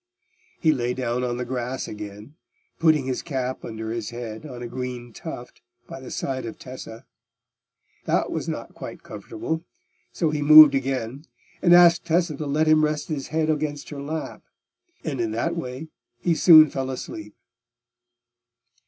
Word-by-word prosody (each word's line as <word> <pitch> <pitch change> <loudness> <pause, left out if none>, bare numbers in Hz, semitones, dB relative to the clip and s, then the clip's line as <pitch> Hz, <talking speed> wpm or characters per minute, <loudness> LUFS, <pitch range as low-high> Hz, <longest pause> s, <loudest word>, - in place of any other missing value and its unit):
He 160 - +4
lay 125 -4 -1
down 125 -1 -2
on 120 -1 -2
the 125 - -3
grass 125 +1 -4
again, 105 +4 -9 0.5
putting 155 -4 +3
his 130 -1 -2
cap 130 -4 -4
under 110 0 -5
his 115 -2 -4
head 120 +2 -7
on 125 -3 -8
a - - -4
green 125 -1 -6
tuft - - -9 0.3
by - - -8
the - - -10
side 130 -1 -3
of 115 - -7
Tessa. 125 -3 -10 1.0
That - - 0
was - - -3
not - - -6
quite - - -9
comfortable; 160 +8 -5 0.5
so 160 -3 0
he 150 -1 -2
moved 155 0 +10
again, 135 0 -2 0.4
and 175 - +3
asked 175 -1 +6
Tessa 170 -1 +1
to 150 - -4
let 150 +3 +1
him 155 0 +4
rest 150 +1 -1
his 145 -4 -3
head 160 0 0
against 150 -1 -3
her 140 -1 -6
lap; 155 +3 -5 0.6
and 140 -6 -3
in 115 - -1
that 165 +10 -1
way 135 -1 -6 0.3
he 175 - +1
soon 155 -2 +8
fell 135 -1 -3
asleep. 105 -5 -7
135 Hz, 160 wpm, -24 LUFS, 120-155 Hz, 1.0 s, moved